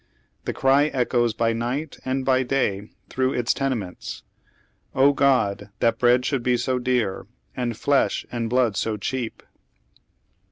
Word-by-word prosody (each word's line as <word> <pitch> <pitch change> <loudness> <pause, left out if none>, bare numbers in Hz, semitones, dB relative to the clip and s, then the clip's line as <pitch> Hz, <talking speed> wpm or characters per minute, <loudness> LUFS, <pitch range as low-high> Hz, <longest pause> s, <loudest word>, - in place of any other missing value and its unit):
The - - -2
cry 135 +2 +3
echoes 120 -4 0
by 115 0 +1
night 125 +7 -3
and 130 0 -2
hy 130 -1 +4
day 110 -6 -1 0.2
through 130 +4 0
its 120 -1 +1
tenements: 120 -10 -4 0.7
Oh, 140 +2 +5
God 125 -8 +2
1 105 - -12
that 115 0 +2
bread 125 0 +4
should 135 -2 0
be 125 0 +2
bo 130 +1 -1
dear, 120 -7 -1 0.3
And 120 -2 -2
flesli 140 +5 +1
aad 115 -1 -2
blood 125 -3 +2
so 110 +2 -1
cheap 120 +3 -4
125 Hz, 150 wpm, -24 LUFS, 115-130 Hz, 0.7 s, Oh